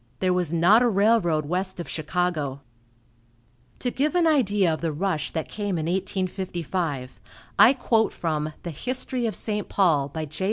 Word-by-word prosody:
There 185 -1 +2
was 180 -3 0
not 175 +7 +5
a 245 - +4
railroad 200 -7 +2
west 185 +4 -2
of 170 - -5
Chicago. 155 -4 -2 1.2
To 245 - -2
give 300 +7 0
an 350 -1 +4
idea 205 - +3
of 155 - -5
the 165 -2 -1
rush 160 0 -1
that 160 - -3
came 205 -4 -3
in 155 - -2
1855, 180 -6 -3 0.4
I 250 - +8
quote 225 -4 +1
from 155 -2 -2
the 170 - -4
"History 250 - -2
of 220 - -3
St. 210 -1 -3
Paul," 155 -8 +2
by 160 +2 -4
J. 150 +1 -10
180 Hz, 165 wpm, -25 LUFS, 160-210 Hz, 1.2 s, I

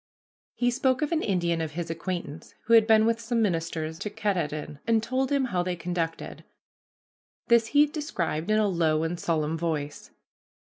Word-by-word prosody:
He 245 0 +1
spoke 260 +2 +1
of 300 - -2
an 325 -1 +1
Indian 170 -4 0
of 155 -2 -4
his 170 0 -4
acquaintance 170 -2 -5
who 230 - +2
had 225 -1 +7
been 220 -1 +5
with 230 0 +1
some 230 +1 -1
ministers 165 -5 -1
to 210 - -3
Katahdin 175 -9 -3
and 230 - +3
had 220 - +1
told 260 +2 -1
him 280 -2 +2
how 180 - +2
they 180 0 -2
conducted. 170 -1 -4 1.1
This 235 -1 +5
he 290 +5 +5
described 215 - -3
in 215 - +3
a 215 -1 +3
low 160 -4 +1
and 170 +1 -3
solemn 160 -1 -1
voice. 150 -3 -3
180 Hz, 180 wpm, -27 LUFS, 165-230 Hz, 1.1 s, had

